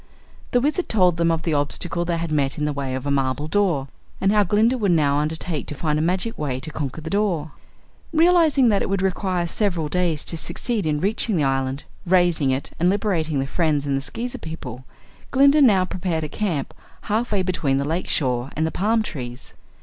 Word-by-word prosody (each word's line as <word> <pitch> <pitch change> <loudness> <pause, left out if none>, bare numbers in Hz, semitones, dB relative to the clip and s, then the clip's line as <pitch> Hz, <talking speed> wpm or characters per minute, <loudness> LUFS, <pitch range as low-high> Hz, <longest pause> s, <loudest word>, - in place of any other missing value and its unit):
The 245 - +3
Wizard 305 +8 0
told 180 -5 +3
them 170 0 +2
of 165 -1 0
the 165 - 0
obstacle 165 +4 -1
they 170 -1 -1
had 165 -1 -3
met 140 -3 0
in 150 - -1
the 150 - -1
way 135 -2 -3
of 130 +1 -5
a 140 - 0
marble 135 +1 0
door, 170 -7 +1 0.3
and 195 - +2
how 210 0 +4
Glinda 215 +6 +2
would 210 -6 0
now 145 -3 +2
undertake 155 +1 -3
to 150 - -5
find 150 +1 0
a - - +1
magic 185 +7 -1
way 135 -4 -2
to 155 - -5
conquer 150 0 -4
the 160 - -6
door. 185 -7 0 0.6
Realizing 320 -6 +4
that 205 -2 +2
it - - -2
would 195 -1 0
require 185 -2 0
several 170 -4 -1
days 170 -3 0
to 165 - +1
succeed 215 +3 -2
in 150 -1 0
reaching 210 +2 +1
the 155 - +2
island 135 0 -1 0.2
raising 175 -6 +3
it 130 +1 -1
and 175 +2 +3
liberating 185 -7 0
their 135 0 -1
friends 150 -2 0
and 140 -1 0
the 135 - -1
Skeezer 240 - -5
people, 130 -6 -8 0.4
Glinda 280 +2 +5
now 200 -9 +5
prepared 175 -3 -2
a 155 - -4
camp 165 -7 -2 0.3
half 225 +3 -1
way 200 -3 +1
between 160 -7 0
the 140 - -1
lake 165 +5 -2
shore 125 -2 0
and 160 - +1
the 160 - -1
palm 220 +3 +1
trees. 125 - -7
165 Hz, 210 wpm, -22 LUFS, 145-200 Hz, 0.6 s, Glinda